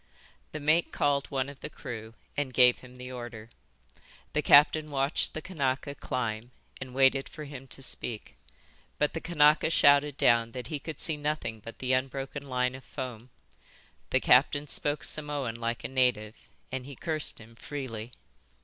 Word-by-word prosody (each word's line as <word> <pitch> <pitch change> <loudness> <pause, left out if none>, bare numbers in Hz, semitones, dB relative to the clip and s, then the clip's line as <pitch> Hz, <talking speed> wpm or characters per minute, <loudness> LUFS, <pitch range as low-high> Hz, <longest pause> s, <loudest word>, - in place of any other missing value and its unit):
The 155 - -5
mate 155 +3 +2
called 140 -1 +1
one 135 -1 -1
of 140 -1 -10
the - - -6
crew 110 -1 -8 0.2
and 135 -3 -2
gave 125 -1 +6
him 125 0 -14
the 125 0 -8
order. 120 -2 -8 0.8
The 150 - +2
captain 150 +2 +6
watched 140 +1 0
the 155 - -5
Kanaka 140 -5 -1
climb 120 -4 -3 0.3
and 130 -1 -7
waited 135 0 +3
for 155 - -8
him 140 -2 -9
to 135 - -9
speak. 115 -3 -1 0.6
But 150 - +1
the 165 - -4
Kanaka 155 -2 +4
shouted 145 -2 +4
down 115 -1 +3
that 125 -2 -5
he 150 - -3
could 155 +1 -7
see 160 -2 +2
nothing 145 -6 -3
but 115 +2 -10
the 130 0 0
unbroken 135 +2 -2
line 125 0 +1
of 130 0 -10
foam. 125 -2 -7 0.8
The - - +3
captain 145 +3 +4
spoke 145 0 -1
Samoan 145 -5 -1
like 115 0 -3
a - - -2
native, 125 -5 0 0.2
and 130 0 -4
he 140 - -9
cursed 155 +2 -1
him 115 +1 -14
freely. 120 -3 -6
135 Hz, 165 wpm, -29 LUFS, 125-145 Hz, 0.8 s, gave